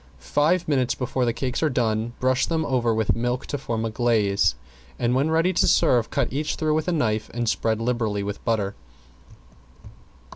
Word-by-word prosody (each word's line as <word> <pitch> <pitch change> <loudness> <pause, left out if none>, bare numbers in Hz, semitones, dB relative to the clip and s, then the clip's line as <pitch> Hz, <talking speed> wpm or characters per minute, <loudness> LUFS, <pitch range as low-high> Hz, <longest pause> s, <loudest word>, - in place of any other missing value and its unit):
Five 165 +4 +1
minutes 130 -4 +1
before 125 0 -1
the 120 - +2
cakes 125 +2 -3
are 155 - +2
done 115 -3 -1
brush 130 +1 +1
them 160 -1 0
over 120 -4 +1
with 110 -1 +1
milk 120 +2 -2
to 145 - -3
form 115 -1 -3
a 110 - -2
glaze, 110 - +2 0.4
and 120 +1 0
when 135 +4 +1
ready 165 +3 +2
to - - +2
serve 120 -3 +3
cut 135 -3 -1
each 150 +2 -1
through 155 -1 0
with 155 +2 -1
a - - +1
knife 110 -9 0
and 120 -1 -1
spread 110 0 0
liberally 115 -4 -1
with 100 0 -5
butter. 105 -3 0
120 Hz, 185 wpm, -24 LUFS, 110-145 Hz, 0.4 s, serve